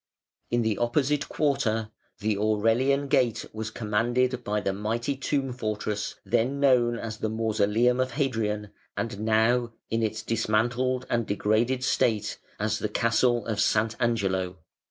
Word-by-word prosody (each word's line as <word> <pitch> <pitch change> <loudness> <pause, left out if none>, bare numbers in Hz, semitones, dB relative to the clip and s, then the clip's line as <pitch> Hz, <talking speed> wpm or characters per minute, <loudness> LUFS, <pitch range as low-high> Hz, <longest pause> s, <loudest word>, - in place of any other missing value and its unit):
In 120 0 +1
the 110 -2 0
opposite 140 +5 +1
quarter 115 -7 0 0.3
the 105 0 +1
Aurelian 115 +7 +2
Gate 125 -6 +2
was 110 0 -4
commanded 120 +3 0
by 105 -1 0
the 100 -1 -1
mighty 115 +7 -2
tomb 135 -1 -1
fortress 105 -3 -3
then 130 +5 +1
known 125 -4 +3
as 110 -1 -6
the 110 - -1
Mausoleum 110 +2 +1
of 130 -1 0
Hadrian, 110 -7 -1 0.3
and 100 - -3
now, 115 +2 +2 0.2
in 115 0 +1
its 110 0 -2
dismantled 120 +3 0
and 115 -2 0
degraded 110 +5 +1
state, 110 -5 +1 0.2
as - - 0
the - - -2
Castle 120 -2 +2
of 110 -2 -2
Sant'Angelo. 105 -4 +1
115 Hz, 135 wpm, -27 LUFS, 110-125 Hz, 0.3 s, known